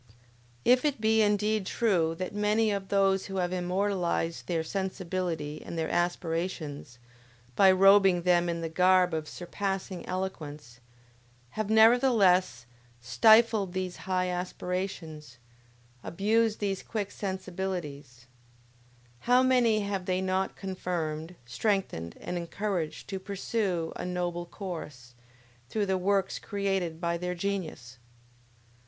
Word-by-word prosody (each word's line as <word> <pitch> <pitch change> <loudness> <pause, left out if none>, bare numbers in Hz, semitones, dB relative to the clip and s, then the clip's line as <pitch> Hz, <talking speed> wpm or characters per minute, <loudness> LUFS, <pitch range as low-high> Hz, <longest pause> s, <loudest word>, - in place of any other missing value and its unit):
If 250 +1 +5
it 290 -5 0
be 220 0 +3
indeed 210 -1 +1
true 175 -8 +1
that 185 +3 -5
many 210 +1 +2
of 200 -1 -3
those 195 -1 +2
who 195 - -6
have 180 -1 -1
immortalized 180 -2 -1
their 165 -2 0
sensibility 180 -4 -3
and 170 - -7
their 160 -1 -1
aspirations, 165 -6 -2 0.6
by 190 +4 +7
robing 195 -1 +5
them 175 -1 +3
in 170 0 -2
the 165 - -2
garb 180 +1 +3
of 155 -1 -3
surpassing 195 0 -4
eloquence, 150 -9 -5 0.7
have, 215 -1 -3
nevertheless, 220 - +4 0.3
stifled 200 - +4
these 185 -1 -3
high 185 -1 -1
aspirations, 180 -5 -4 0.7
abused 220 +4 +1
these 195 -2 -2
quick 205 -3 -4
sensibilities, 180 - -5 0.9
how 250 - +4
many 240 -4 +3
have 200 -2 -3
they 185 0 +1
not 190 0 -1
confirmed, 175 -3 -4
strengthened 120 - -2
and 180 - -4
encouraged 175 -1 -3
to 195 -1 -3
pursue 190 -3 -2
a - - -5
noble 175 -1 -3
course, 150 - -8 0.6
through 215 -2 0
the 190 -1 0
works 190 +1 0
created 195 -5 -2
by 170 0 -1
their 180 0 -3
genius! 170 -10 -4
185 Hz, 120 wpm, -29 LUFS, 170-200 Hz, 0.9 s, by